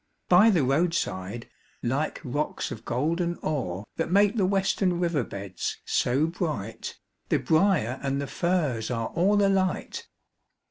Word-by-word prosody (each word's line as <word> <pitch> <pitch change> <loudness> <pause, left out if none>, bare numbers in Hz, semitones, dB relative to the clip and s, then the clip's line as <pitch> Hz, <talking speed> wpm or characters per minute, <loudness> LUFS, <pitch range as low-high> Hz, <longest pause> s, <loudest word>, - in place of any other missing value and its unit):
By 185 +5 +7
the 175 -9 +3
roadside, 130 - -1 0.4
like 135 +6 -1
rocks 145 +2 -2
of 115 -4 -8
golden 170 +7 0
ore 100 - -2
That 165 - -1
make 200 +4 +4
the 195 -5 +2
western 190 -2 +1
river 170 -6 +1
beds 100 -3 -5
so 135 +5 +2
bright, 155 - -4 0.3
The - - +3
briar 155 - +2
and 140 0 -1
the 140 - -2
furze 150 -9 0
are 115 -2 -2
all 200 +4 +3
alight! 190 -2 0
155 Hz, 135 wpm, -26 LUFS, 125-180 Hz, 0.4 s, By